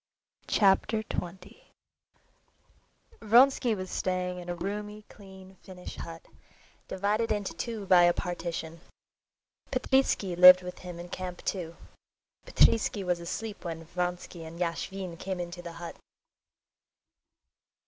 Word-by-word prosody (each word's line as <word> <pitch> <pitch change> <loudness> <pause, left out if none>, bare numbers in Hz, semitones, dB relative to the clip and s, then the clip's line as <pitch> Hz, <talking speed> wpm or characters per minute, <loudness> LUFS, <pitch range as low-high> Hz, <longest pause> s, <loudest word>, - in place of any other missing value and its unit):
Chapter 215 +2 +3
20 180 -2 -7 1.6
Vronsky 240 +1 +5
was 185 -2 -6
staying 180 -1 -2
in 175 0 -9
a 175 - -2
roomy, 210 +3 -5
clean, 190 -1 -14
Finnish 180 -1 -10
hut, 165 0 -8 0.6
divided 210 +4 0
into 205 -2 -1
two 225 -4 -5
by 180 -2 +6
a 175 - +5
partition. 170 -2 -4 0.9
Petritsky 265 -9 +1
lived 180 +1 +9
with 180 0 -7
him 180 -2 -8
in 175 +1 -8
camp 180 -1 -6
too. 170 -4 -3 0.7
Petritsky 215 -3 +3
was 180 -1 0
asleep 205 +5 -6
when 165 -2 -6
Vronsky 180 0 -4
and 165 +1 -10
Yashvin 180 +1 -3
came 190 -1 -4
into 175 0 -6
the 170 -1 -8
hut. 170 0 -8
180 Hz, 115 wpm, -29 LUFS, 175-200 Hz, 1.6 s, lived